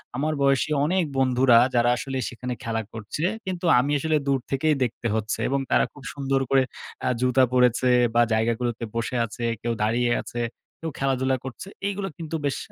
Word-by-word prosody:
আমার 155 Hz, +4 st, 0 dB
বয়সী 135 Hz, +1 st, +3 dB, 0.2 s
অনেক 185 Hz, +2 st, +2 dB
বন্ধুরা 130 Hz, -2 st, +4 dB, 0.2 s
যারা 120 Hz, 0 st, +4 dB
আসলে 135 Hz, 0 st, -4 dB
সেখানে 125 Hz, +1 st, -5 dB
খেলা 115 Hz, -1 st, -1 dB
করছে, 110 Hz, +8 st, -5 dB, 0.2 s
কিন্তু 180 Hz, -1 st, -4 dB
আমি 140 Hz, +3 st, 0 dB
আসলে 155 Hz, +1 st, +1 dB
দূর 135 Hz, -1 st, +2 dB
থেকেই 150 Hz, +3 st, +2 dB
দেখতে 120 Hz, 0 st, -2 dB
হচ্ছে 110 Hz, 0 st, -2 dB
এবং 140 Hz, 0 st, +1 dB
তারা -, -, +4 dB
খুব 145 Hz, -, -14 dB
সুন্দর 135 Hz, -1 st, 0 dB
করে 135 Hz, -1 st, +4 dB, 0.4 s
আ -, -, +3 dB
জুতা 125 Hz, +1 st, +4 dB
পরেছে 125 Hz, 0 st, +3 dB, 0.3 s
বা 120 Hz, -, +6 dB
জায়গাগুলোতে 115 Hz, +1 st, 0 dB
বসে 115 Hz, +2 st, -2 dB
আছে, 120 Hz, +2 st, -8 dB, 0.2 s
কেউ 120 Hz, -1 st, -1 dB
দাঁড়িয়ে 120 Hz, +2 st, +1 dB
আছে, 120 Hz, -, -5 dB, 0.4 s
কেউ 165 Hz, -, -4 dB
খেলাধুলা 130 Hz, -1 st, +1 dB
করছে। 130 Hz, +8 st, -8 dB, 0.2 s
এইগুলো 200 Hz, -1 st, -2 dB
কিন্তু 165 Hz, -1 st, -5 dB
বেশ 140 Hz, -, 0 dB
130 Hz, 175 wpm, -25 LUFS, 120-140 Hz, 0.4 s, বা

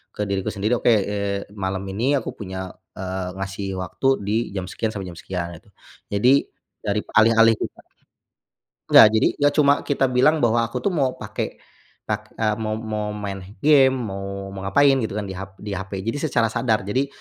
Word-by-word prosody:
ke 105 Hz, -1 st, -2 dB
diriku 95 Hz, -1 st, -1 dB
sendiri, 105 Hz, +4 st, 0 dB
"Oke, 120 Hz, -, +3 dB
eee, 100 Hz, -1 st, 0 dB
malam 95 Hz, -1 st, -2 dB
ini 120 Hz, +8 st, 0 dB
aku -, -, -7 dB
punya, 95 Hz, -2 st, -6 dB, 0.3 s
eee, 95 Hz, -1 st, -3 dB
ngasih 95 Hz, 0 st, -4 dB
waktu 90 Hz, +8 st, -2 dB, 0.2 s
di 105 Hz, -, +1 dB, 0.2 s
jam 95 Hz, -1 st, -2 dB
sekian 110 Hz, +2 st, -3 dB
sampe 100 Hz, -4 st, -6 dB
jam 85 Hz, -, -8 dB
sekian." 85 Hz, +2 st, -4 dB
Gitu. -, -, -26 dB, 0.4 s
Jadi, 105 Hz, +6 st, +4 dB, 0.5 s
darip 105 Hz, +1 st, -1 dB
alih-alih 115 Hz, 0 st, +6 dB
kita -, -, -6 dB, 1.1 s
Nggak. 110 Hz, -, +10 dB
Jadi, 110 Hz, -, +4 dB
gak 145 Hz, 0 st, +3 dB
cuma 145 Hz, -2 st, +5 dB
kita 140 Hz, -2 st, +1 dB
bilang 135 Hz, +3 st, +3 dB
bahwa 115 Hz, 0 st, +3 dB
aku -, -, -5 dB
tuh 200 Hz, -, +1 dB
mau 135 Hz, -6 st, 0 dB
pake, -, -, -5 dB, 0.5 s
pak -, -, -5 dB
eee, 110 Hz, -1 st, +1 dB
mo 110 Hz, -1 st, -2 dB
mo 105 Hz, -1 st, -4 dB
main 100 Hz, -2 st, -5 dB, 0.2 s
gim 135 Hz, -3 st, +6 dB
mo 100 Hz, -4 st, -5 dB
mau 95 Hz, -, -7 dB
ngapain 140 Hz, +8 st, +5 dB
gitu, 110 Hz, -3 st, -3 dB
kan, 105 Hz, -, -2 dB
di 95 Hz, -, -6 dB
hap 95 Hz, +1 st, -8 dB
di 105 Hz, 0 st, -8 dB
HP, 95 Hz, 0 st, -5 dB
jadi 115 Hz, +6 st, -2 dB
secara 115 Hz, -4 st, +2 dB
sadar. 110 Hz, -5 st, +1 dB
Jadi, 130 Hz, +8 st, 0 dB
105 Hz, 185 wpm, -22 LUFS, 95-120 Hz, 1.1 s, Nggak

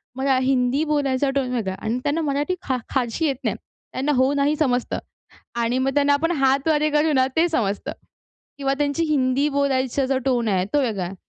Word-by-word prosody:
मरा 265 Hz, 0 st, +1 dB
हिंदी 260 Hz, +2 st, +1 dB
बोलायचा 280 Hz, -3 st, 0 dB
टोन 260 Hz, -2 st, 0 dB
वेगळा 210 Hz, -6 st, -1 dB
आहे. -, -, -10 dB
आणि 245 Hz, +2 st, 0 dB
त्यांना 300 Hz, +3 st, 0 dB
मराठी 295 Hz, +4 st, -1 dB
फा 260 Hz, -1 st, +1 dB, 0.2 s
फारशी 255 Hz, +4 st, 0 dB
येत 280 Hz, -3 st, +1 dB
नाही. -, -, 0 dB, 0.4 s
त्यांना 275 Hz, +3 st, 0 dB
हो 260 Hz, +2 st, +3 dB
नाही 285 Hz, +2 st, +1 dB
समजतं. 250 Hz, -5 st, 0 dB, 0.6 s
आणि 235 Hz, +2 st, 0 dB
मग 270 Hz, 0 st, 0 dB
त्यांना 285 Hz, 0 st, +3 dB
आपण 330 Hz, +4 st, 0 dB
हातवारे 295 Hz, +3 st, +2 dB
करू 300 Hz, +1 st, +2 dB
ना 260 Hz, -1 st, +3 dB
ते 340 Hz, +2 st, +4 dB
समजतं. 210 Hz, -10 st, -1 dB, 0.7 s
किंवा 275 Hz, 0 st, 0 dB
त्यांची 290 Hz, +3 st, 0 dB
हिंदी 280 Hz, -1 st, +1 dB
बोलायचा 275 Hz, -2 st, 0 dB
जो 265 Hz, -1 st, +1 dB
टोन 240 Hz, -4 st, +1 dB
आहे 185 Hz, -2 st, +1 dB
तो 290 Hz, -, +4 dB
वेगळा 210 Hz, -7 st, -1 dB
आहे. 185 Hz, +3 st, -6 dB
270 Hz, 190 wpm, -22 LUFS, 255-290 Hz, 0.7 s, ते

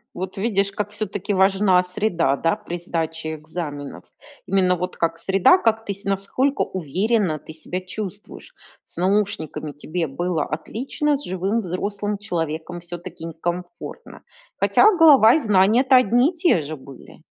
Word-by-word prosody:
Вот 185 Hz, +2 st, -5 dB
видишь, 200 Hz, -1 st, 0 dB
как 205 Hz, +1 st, -4 dB
всё-таки 205 Hz, -1 st, -3 dB
важна 190 Hz, -1 st, +4 dB
среда, 180 Hz, -6 st, 0 dB
да, 165 Hz, +3 st, +1 dB
при 175 Hz, -, -6 dB
сдаче 160 Hz, -2 st, -3 dB
экзаменов. 150 Hz, -, -7 dB, 0.4 s
Именно 185 Hz, -1 st, +2 dB
вот 180 Hz, +1 st, -4 dB
как 165 Hz, 0 st, -1 dB
среда, 195 Hz, -, +4 dB
как 225 Hz, -7 st, 0 dB
ты, 200 Hz, -, -2 dB
с 200 Hz, -, -11 dB
насколько 200 Hz, +8 st, 0 dB
уверенно 185 Hz, -, 0 dB
ты -, -, -12 dB
себя 165 Hz, +4 st, -5 dB
чувствуешь. 205 Hz, -, -8 dB, 0.3 s
С -, -, -14 dB
наушниками 185 Hz, -5 st, -1 dB
тебе 160 Hz, +4 st, -3 dB
было 165 Hz, +4 st, -1 dB
отлично, 270 Hz, -, -2 dB
с 285 Hz, -, -9 dB
живым 190 Hz, +5 st, -1 dB
взрослым 200 Hz, +3 st, -3 dB
человеком 165 Hz, -3 st, -4 dB
всё-таки 175 Hz, 0 st, -9 dB
некомфортно. 175 Hz, -, -6 dB, 0.4 s
Хотя 430 Hz, -, +5 dB
голова 285 Hz, -9 st, +7 dB
и -, -, +3 dB
знания 210 Hz, 0 st, +4 dB
то 265 Hz, -1 st, +4 dB
одни 250 Hz, +3 st, +4 dB
и -, -, -19 dB
те 330 Hz, -, +3 dB
же 155 Hz, +2 st, -6 dB
были. 135 Hz, -1 st, -14 dB
185 Hz, 150 wpm, -22 LUFS, 165-210 Hz, 0.4 s, голова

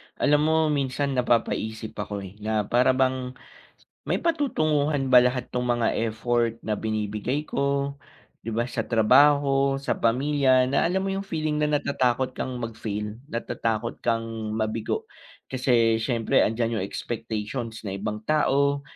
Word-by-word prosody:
Alam 150 Hz, +1 st, +3 dB
mo 160 Hz, -, +3 dB, 0.2 s
minsan 140 Hz, 0 st, -1 dB
napapaisip 115 Hz, -3 st, 0 dB
ako, 105 Hz, -1 st, -4 dB
eh, 95 Hz, +2 st, -11 dB
na 105 Hz, 0 st, 0 dB
para 125 Hz, +4 st, +3 dB
bang 130 Hz, -1 st, 0 dB, 0.7 s
may -, -, +2 dB
patutunguhan 155 Hz, -, 0 dB
ba 125 Hz, -, +10 dB
lahat 125 Hz, 0 st, -1 dB
'tong 125 Hz, -, 0 dB, 0.2 s
mga 115 Hz, -1 st, +1 dB, 0.2 s
effort 115 Hz, +1 st, 0 dB
na 110 Hz, -, -1 dB
binibigay 110 Hz, +6 st, -2 dB
ko. 140 Hz, -1 st, -1 dB, 0.5 s
'Di -, -, -9 dB
ba 115 Hz, +1 st, 0 dB
sa 120 Hz, -, -4 dB
trabaho, 135 Hz, +4 st, +4 dB
sa 135 Hz, -, -2 dB
pamilya, 130 Hz, +2 st, +3 dB
na 135 Hz, +5 st, +1 dB
alam 190 Hz, +2 st, 0 dB
mo 195 Hz, -, -1 dB
yung 195 Hz, -, -2 dB
feeling 155 Hz, -4 st, -1 dB
na 150 Hz, -, +2 dB
natatakot 130 Hz, -2 st, 0 dB
kang -, -, -4 dB
mag-fail, 110 Hz, -2 st, -5 dB
natatakot 115 Hz, -1 st, -3 dB
kang 115 Hz, -1 st, 0 dB, 0.3 s
mabigo 110 Hz, 0 st, -2 dB, 0.5 s
kasi 120 Hz, -3 st, +2 dB
syempre 115 Hz, -1 st, +1 dB
andiyan 115 Hz, 0 st, 0 dB
yung -, -, -1 dB
expectations 115 Hz, +1 st, -5 dB
na 100 Hz, -, -4 dB
ibang 105 Hz, +2 st, -4 dB
tao, 140 Hz, -1 st, +2 dB
125 Hz, 140 wpm, -25 LUFS, 110-140 Hz, 0.7 s, ba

